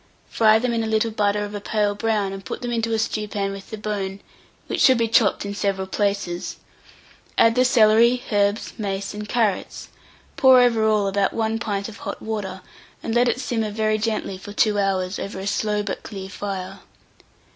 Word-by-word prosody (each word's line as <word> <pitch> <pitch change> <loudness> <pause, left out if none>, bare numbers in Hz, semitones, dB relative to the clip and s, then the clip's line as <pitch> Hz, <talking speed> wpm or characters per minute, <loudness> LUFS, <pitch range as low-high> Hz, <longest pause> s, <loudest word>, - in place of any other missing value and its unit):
Fry 220 -1 +5
them 240 +1 -1
in 230 -1 0
a - - -2
little 220 +1 +1
butter 205 -1 0
of 205 - -8
a 205 - -5
pale 205 0 0
brown, 205 -2 -1
and 195 0 -8
put 255 - -6
them 240 - -2
into 230 -1 -1
a 225 - +1
stewpan 210 -2 -2
with 195 0 -9
the 220 - -6
bone 200 -2 -4 0.5
(which - - -2
should 260 -2 +6
be 230 -1 +1
chopped 220 -3 +2
in 200 - -4
several 195 -2 -1
places); 200 -3 -2 0.8
add 230 - +5
the 250 +2 +3
celery, 235 0 +4
herbs, 205 +1 +1
mace, 195 -1 -3
and 210 0 -7
carrots; 220 -5 -1 0.5
pour 260 -1 +7
over 235 -3 +3
all 210 -2 +2
about 195 0 +1
1 225 0 -1
pint 200 -3 -2
of 225 -1 -10
hot - - -6
water, 200 -4 -4 0.4
and 225 - -2
let 240 +1 +4
it 250 - -1
simmer 225 -4 -1
very 215 0 0
gently 215 -3 -2
for 205 +1 -9
2 210 -1 +2
hours, 190 -1 0
over 200 - -5
a 190 - -5
slow 210 0 0
but 200 - -4
clear 195 -3 -8
fire. 195 -1 -5
210 Hz, 195 wpm, -22 LUFS, 200-225 Hz, 0.8 s, pour